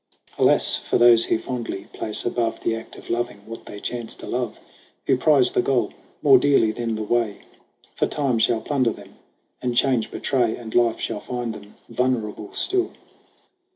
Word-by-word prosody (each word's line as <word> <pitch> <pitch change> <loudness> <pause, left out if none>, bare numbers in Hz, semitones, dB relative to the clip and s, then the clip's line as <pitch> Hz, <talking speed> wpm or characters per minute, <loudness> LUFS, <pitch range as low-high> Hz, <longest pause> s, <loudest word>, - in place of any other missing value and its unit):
Alas - - +4
for - - -1
those 120 -1 +6
who - - +1
fondly 120 -5 -5
place 110 - 0
above 120 -1 -1
The 115 - 0
act 115 0 -9
of - - -9
loving, 120 -3 -2
what 115 +1 -10
they 105 - -8
chance 120 +1 -5
to - - -10
love; 125 -2 -3 0.5
Who - - +3
prize 135 -1 +4
the - - +2
goal 130 -1 0 0.3
more 135 -4 +7
dearly 135 -5 +3
than 115 0 -3
the 110 - -3
way! 110 -2 -1 0.5
For - - 0
time 135 -6 0
shall 110 0 +2
plunder 130 -5 +1
them, - - -14 0.5
and 125 -1 -2
change 125 -3 +2
betray, 120 -5 0
And 115 -2 -9
life 120 -2 +2
shall - - -3
find 120 0 -4
them 105 -1 -13
vulnerable 115 -4 -2
still. 375 -1 +1
120 Hz, 175 wpm, -23 LUFS, 110-125 Hz, 0.5 s, more